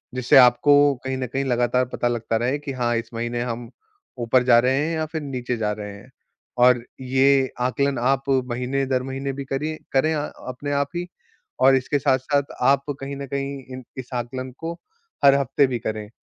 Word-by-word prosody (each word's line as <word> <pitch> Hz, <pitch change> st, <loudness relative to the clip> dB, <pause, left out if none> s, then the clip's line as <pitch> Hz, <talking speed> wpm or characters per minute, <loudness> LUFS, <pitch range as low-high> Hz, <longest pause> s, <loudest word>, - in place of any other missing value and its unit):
जिससे 125 Hz, +1 st, +4 dB
आपको 125 Hz, +3 st, +6 dB, 0.3 s
कहीं 130 Hz, 0 st, -2 dB
न 130 Hz, -1 st, -3 dB
कहीं 135 Hz, +3 st, -2 dB
लगातार 125 Hz, 0 st, +1 dB
पता 120 Hz, -, 0 dB
लगता 115 Hz, -1 st, -1 dB
रहे 125 Hz, +5 st, -1 dB
कि 145 Hz, -1 st, -6 dB
हाँ, 120 Hz, -2 st, 0 dB
इस 115 Hz, -, -5 dB
महीने 120 Hz, +1 st, -3 dB
हम 120 Hz, -1 st, -4 dB, 0.5 s
ऊपर 120 Hz, +2 st, +3 dB
जा 120 Hz, -2 st, +6 dB
रहे 130 Hz, +2 st, +2 dB
हैं 165 Hz, -, -2 dB
या 160 Hz, 0 st, -1 dB
फिर 160 Hz, 0 st, -5 dB
नीचे 125 Hz, -4 st, -3 dB
जा 105 Hz, -2 st, -1 dB
रहे 105 Hz, -1 st, -6 dB
हैं। 105 Hz, -, -16 dB, 0.5 s
और 125 Hz, -1 st, +5 dB, 0.2 s
ये 135 Hz, +1 st, +3 dB
आकलन 135 Hz, +2 st, 0 dB
आप 135 Hz, +2 st, +1 dB, 0.3 s
महीने-दर-महीने 135 Hz, +2 st, -2 dB
भी 140 Hz, 0 st, -6 dB
करिए 150 Hz, +4 st, -3 dB, 0.2 s
करें 155 Hz, +4 st, +3 dB
अ 150 Hz, -, -1 dB, 0.3 s
अपने 145 Hz, +3 st, -5 dB
आप 140 Hz, 0 st, +1 dB
ही, 175 Hz, +1 st, -3 dB, 0.5 s
और 135 Hz, +1 st, +6 dB
इसके 135 Hz, +2 st, 0 dB
साथ-साथ 135 Hz, +2 st, +1 dB, 0.2 s
आप 135 Hz, +2 st, +4 dB, 0.2 s
कहीं 135 Hz, +1 st, -5 dB
न 140 Hz, -, -5 dB
कहीं 140 Hz, +1 st, -4 dB
इन 130 Hz, -, -8 dB
इस 130 Hz, -2 st, -7 dB
आकलन 130 Hz, +2 st, -4 dB
को 165 Hz, +1 st, -4 dB, 0.5 s
हर 140 Hz, 0 st, +8 dB
हफ्ते 140 Hz, +1 st, +2 dB
भी 125 Hz, -2 st, -3 dB
करें। 110 Hz, -1 st, -4 dB
130 Hz, 190 wpm, -23 LUFS, 120-140 Hz, 0.5 s, हर